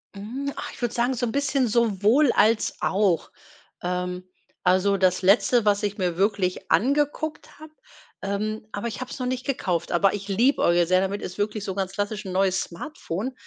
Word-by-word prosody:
Hm, 260 +8 -5
ach, - - -6
ich - - -13
würde 240 - -1
sagen, 245 +2 +1
so 245 0 -1
'n 225 - -2
bisschen 275 -2 +1
sowohl 230 +4 +3
als 215 +1 +3
auch. 190 -4 +1 0.5
Ähm, 180 0 -2 0.4
also 190 +2 +3
das 185 -1 +2
letzte 215 +4 +4
was 205 0 +2
ich 205 0 -2
mir 180 -3 -1
wirklich 195 -2 0
angeguckt 290 +4 0
habe 310 0 -12 0.5
ähm, 215 +2 -3
aber 205 +3 -4
ich 220 - -5
habe 255 - -6
es - - -7
noch 250 - -2
nicht 255 0 -3
gekauft, 180 -11 -1
aber 190 +3 +3
ich 200 0 -7
liebäugele 190 -6 +3
sehr 185 0 +4
damit 195 +1 -2
ist 185 - -7
wirklich 210 0 -2
so 190 - -4
ganz 190 -1 -2
klassisch 205 +1 -3
n' 190 - -5
neues 190 0 +2
Smartphone. 220 - -5
205 Hz, 185 wpm, -25 LUFS, 190-245 Hz, 0.5 s, letzte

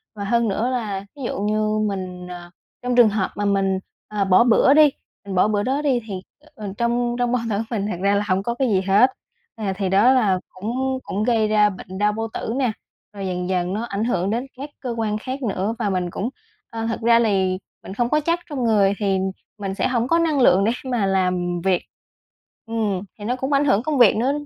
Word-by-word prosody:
và 205 - -5
hơn 235 +3 +1
nữa 220 +4 0
là 210 -6 -3
ví 280 - -8
dụ - - -3
như 215 +1 0
mình, 185 -2 -5
à 175 0 -9 0.3
trong 245 0 -1
trường 240 -3 +7
hợp 200 -2 -1
mà 205 - -2
mình, 195 -1 +1 0.3
à, 210 -2 -1
bỏ 190 +4 +5
bữa 250 +3 +5
đi, 305 0 +7 0.4
mình 195 -1 -5
bỏ 185 - +4
bữa 205 -1 0
đó 270 +5 0
đi, 270 -5 +2
thì, 190 -3 -5 0.3
ờ, 205 -4 -6
trong 240 0 0
trong 245 -1 +1
bao 250 - +1
tử 200 - 0
mình 210 -4 -2
thật - - -3
ra 200 +1 +3
là 205 - +1
hông 190 0 +1
có 235 - -1
cái 265 0 +1
gì 190 -3 +2
hết. 200 +7 +4 0.4
À, 205 -4 -2
thì 195 -2 -1
đó 205 +7 +5
là 205 -8 +2
cũng 260 +7 -3
cũng 205 +3 -2
gây 225 -2 +2
ra 210 -1 +4
bệnh 190 -1 -9
đau 210 +1 +2
bao 225 +1 -3
tử 225 - -3
nè, 255 -4 +1 0.4
rồi 195 -2 -5
dần 180 0 -3
dần 180 0 0
nó 215 - -2
ảnh 210 -2 -3
hưởng 195 -5 0
đến 235 +5 -1
các 280 +3 -6
cơ 255 - -5
quan 215 -2 -1
khác 260 +4 -5
nữa. 205 0 -1
Và 205 - 0
mình 180 -2 -1
cũng 200 +6 -3 0.4
ờ, 225 0 -4
thật 230 - -3
ra 230 0 +5
lì 190 -5 +1 0.3
mình 190 - -8
không 240 +2 0
có 305 - +3
chất 335 +3 0
trong 275 -4 -3
người 205 -4 +3
thì 195 -2 +1 0.4
mình 195 -2 -4
sẽ - - +1
hổng 240 -2 0
có 335 +4 +3
năng 315 -5 +1
lượng 195 -5 +5
để 220 - +2 0.2
mà 230 -5 +1
làm 180 -2 0
việc. 185 -2 +2 0.8
Ừm, 220 -5 -1 0.2
thì 205 - -7
nó 245 +3 0
cũng 265 +2 -2
ảnh 280 +1 +3
hưởng 220 -5 +3
công 300 +1 -1
việc 240 -5 +6
nữa. 250 +4 +2
215 Hz, 235 wpm, -22 LUFS, 195-240 Hz, 0.8 s, trường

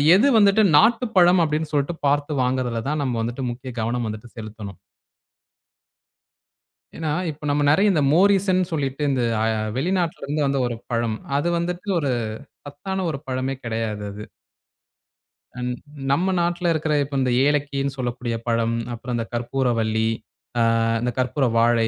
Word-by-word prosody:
எது 220 +9 +4
வந்துட்டு 205 +1 +5 0.2
நாட்டுப் 230 +5 +3
பழம் 175 0 +6
அப்டின்னு 155 0 -1
சொல்லிட்டு 145 +3 0
பார்த்து 145 +1 +1
வாங்குறதுலதான் 130 +3 -1
நம்ம 130 -3 -1
வந்துட்டு 120 +4 -3
முக்கிய 125 +2 -7
கவனம் 120 +1 -1
வந்துட்டு 110 +2 -6
செலுத்தணும். 110 -3 -8 2.2
ஏன்னா, 160 -1 -2 0.2
இப்ப 150 0 -8
நம்ம 145 +1 +1
நெறைய 195 +8 +4
இந்த 160 -5 +2
மோரீசன் 190 +1 +4
சொல்லிட்டு 140 -3 -2
இந்த 130 -3 +1 0.5
வெளிநாட்டுல 175 +1 -1
இருந்து 145 +1 0
வந்த 140 0 +1
ஒரு 120 - -3 0.2
பழம். 115 -2 0 0.2
அது 145 - 0
வந்துட்டு 175 +3 -3
ஒரு 140 -4 0 0.5
சத்தான 185 +7 -4
ஒரு 135 - -5
பழமே 130 +1 -2
கிடையாது 110 -2 -3
அது. 105 +1 -8 1.4
ம் 125 0 -2 0.4
நம்ம 185 +6 +2
நாட்டுல 175 0 0
இருக்கிற 155 0 -1
இப்ப 140 0 -6
இந்த 125 -1 +1
ஏலக்கின்னு 140 -1 0
சொல்லக்கூடிய 120 -2 -3
பழம், 115 0 +1 0.2
அப்புறம் 120 +2 -5
இந்தக் 115 0 -4
கற்பூரவள்ளி, 115 -3 0 0.5
அ - - +3 0.4
இந்தக் 125 +1 -2
கற்பூர 130 +2 +1
வாழை, 115 -1 +3
135 Hz, 140 wpm, -23 LUFS, 120-160 Hz, 2.2 s, பழம்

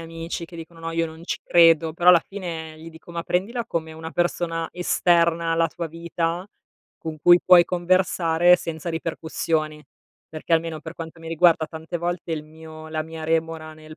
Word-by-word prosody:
amici 165 +1 -6
che 170 0 -12
dicono: 165 0 -11
"No, 165 0 -4
io 165 0 0
non 160 +1 -11
ci - - -3
credo". 165 -2 +4
Però 175 +1 +6
alla 175 -2 +6
fine 165 -5 -7
gli 165 +1 -10
dico: 160 +1 -14
"Ma 170 - -3
prendila 225 +9 -1
come 160 -3 -4
una 160 0 -8
persona 165 -1 -1
esterna 170 -1 +2
alla 165 0 +2
tua 170 +2 -5
vita 170 +2 -3 0.5
con 160 -1 -6
cui 175 +3 +6
puoi 180 -1 +7
conversare 175 -1 +3
senza 165 0 -5
ripercussioni." 160 -1 -2 0.5
Perché, 160 +2 -6
almeno 165 -1 +1
per 160 +1 -9
quanto 165 -1 -8
mi 165 0 -9
riguarda, 165 -1 +3
tante 160 +2 -6
volte 175 0 -3
il 155 -1 -4
mio 160 0 -12
la 155 0 -2
mia 160 0 -8
remora 160 0 -1
nel 155 0 -13
165 Hz, 180 wpm, -23 LUFS, 160-170 Hz, 0.5 s, puoi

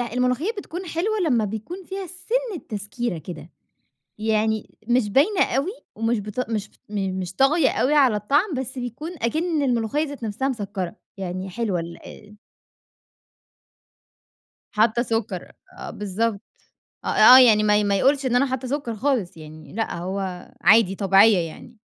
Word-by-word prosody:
الملوخية 250 - 0
بتكون 365 -1 -6
حلوة 370 +7 -1
لمّا 235 -7 +2
بيكون 220 - -6
فيها 385 0 -5
سِنة 440 +2 -3
تسكيرة 210 -2 -4
كده، 160 0 -9 0.7
يعني 220 0 -1
مش 240 -3 +2
باينة 355 - +3
أوي 290 +8 0 0.2
ومش 225 0 0
بتق 210 +4 -4
مش 215 -2 -3 0.2
مش 190 -3 -3
طاغية 275 +1 +4
أوي 270 +4 +1
على 265 -7 +5
الطعم، 290 - +1
بس 260 0 -4
بيكون 250 +7 -5
أكِن 315 +6 0
الملوخية 245 +4 0
ذات 285 -4 -9
نفسها 225 +5 -2
مسكّرة 200 -6 -4 0.2
يعني 185 0 -4
حلوة 200 -3 -2
ال 170 +5 -10 2.4
حاطة 220 +2 +2
سكّر 225 -6 -3 0.3
آه - - -7
بالضبط، 210 +1 -2 0.7
آه - - -3
آه 255 +1 +8
يعني 220 -4 +6
ما 210 0 +4
ي 210 - +1
ما 200 -1 +1
يقولش 275 +4 +2
إن 245 - +1
أنا 265 +3 +4
حاطة 260 -1 -3
سكّر 265 -4 -3
خالص 230 -8 -1
يعني 155 0 -12
لأ 225 +2 -2
هو 185 0 -4
عادي 205 -2 +5
طبيعية 195 +2 +5
يعني. 230 +8 -13
230 Hz, 145 wpm, -23 LUFS, 200-275 Hz, 2.4 s, آه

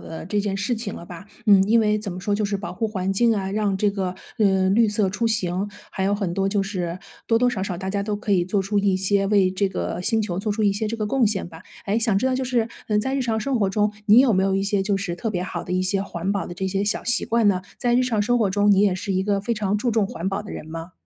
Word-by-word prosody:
的 160 - -8
这 205 +3 -1
件 200 -1 -2
事 200 +5 -1
情 220 -3 -5
了 - - -9
吧。 175 +2 -10 0.2
嗯， 200 -2 +7
因 230 +2 +5
为 215 -1 +2
怎 205 -2 -5
么 180 - -6
说 205 +3 -1
就 210 - -1
是 200 -1 0
保 195 - -6
护 225 -2 -2
环 195 -2 -2
境 230 +3 +3
啊， 190 -1 -2
让 205 -2 0
这 205 +1 +2
个， 190 -2 -3 0.2
呃， 190 -2 +3
绿 220 +2 +4
色 205 -2 +1
出 230 +5 -1
行， 195 -3 -1 0.2
还 190 - -4
有 200 - +2
很 200 -4 -2
多 195 +2 0
就 195 0 +1
是 180 -3 -3 0.3
多 230 0 +3
多 250 0 +3
少 195 -6 -3
少 190 -3 -3
大 190 +2 -4
家 200 0 -1
都 205 0 -2
可 205 0 -2
以 185 -3 +3
做 190 +3 0
出 205 +2 0
一 200 -2 +2
些 195 +1 +1
为 195 -2 +3
这 195 +1 0
个 185 - -3
星 220 +4 +1
球 185 -4 -3
做 210 +2 -2
出 210 +1 -1
一 205 -1 +3
些 215 +2 -2
这 230 - -3
个 215 -2 -2
贡 245 +1 +2
献 200 -2 -1
吧。 165 -1 -12 0.2
诶， 205 +3 +1
想 225 -3 +1
知 200 - 0
道 260 0 +2
就 260 - -1
是， 245 -3 0 0.2
嗯， 210 -1 +2
在 265 +6 -1
日 275 - 0
常 230 -3 0
生 250 +1 -1
活 200 - +2
中 210 +2 +1
你 215 +2 +7
有 260 -3 +4
没 190 -1 +2
有 195 0 +1
一 195 - 0
些 200 0 0
就 200 0 0
是 195 -3 -3
特 200 +6 -4
别 180 -3 -2
好 180 -2 -4
的 180 - -6
一 185 - +1
些 190 +1 0
环 190 -1 -3
保 200 - -2
的 175 - -7
这 190 +2 -3
些 195 +1 -1
小 205 - -1
习 240 -1 0
惯 230 -1 +2
呢？ 185 -2 +2 0.2
在 240 -2 +1
日 250 - +4
常 230 -5 0
生 245 +3 +2
活 215 -4 +2
中 205 +2 +3
你 195 - +4
也 200 -2 +3
是 195 +1 -3
一 190 0 +1
个 200 0 +1
非 235 - -1
常 205 -2 0
注 235 +4 0
重 220 -3 +2
环 175 -2 -6
保 195 +1 -1
的 205 - -10
人 - - -7
吗？ 165 +2 -7
200 Hz, 335 characters per minute, -23 LUFS, 190-215 Hz, 0.3 s, 嗯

